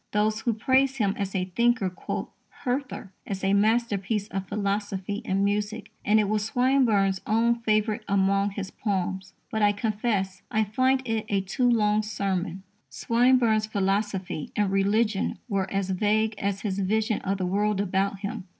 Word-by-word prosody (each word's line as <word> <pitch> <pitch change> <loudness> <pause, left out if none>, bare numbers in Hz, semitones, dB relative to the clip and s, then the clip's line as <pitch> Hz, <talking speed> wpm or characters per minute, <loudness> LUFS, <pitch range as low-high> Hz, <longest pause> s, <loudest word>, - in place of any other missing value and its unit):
_ - - -48
Those 215 +1 +1
who 235 - +1
praise 265 +4 +2
him 205 -6 +1
as 195 -1 -4
a 185 -1 0
thinker 230 +2 +1
quote 185 - -5 0.3
Hertha 255 -6 -3 0.2
as 195 -1 -4
a 195 +1 +2
masterpiece 210 -1 +1
of 195 -1 -4
philosophy 200 0 -2
in 195 +1 +1
music, 210 +2 -2
and 215 +1 +4
it 210 - +2
was 210 0 0
Swinburne's 225 -6 +2
own 235 +2 +2
favourite 215 0 +1
among 195 0 +2
his 195 -1 -6
poems. 190 -2 -3 0.2
But 220 - -1
I 205 0 +4
confess 205 -2 -1
I 220 0 +2
find 260 +5 +1
it 225 -2 -2
a 200 -1 +1
too 220 +6 0
long 210 -2 +3
sermon. 190 -3 -3 0.3
Swinburne's 235 -2 +2
philosophy 195 -4 -1
and 205 -2 +1
religion 200 +1 +1
were 195 -4 -1
as 195 -1 -1
vague 215 +3 +1
as 200 0 -2
his 200 -2 -2
vision 215 +2 0
of 195 +1 -1
the 185 - -2
world 205 +2 0
about 195 0 0
him. 200 -3 -5
205 Hz, 165 wpm, -26 LUFS, 195-220 Hz, 0.3 s, and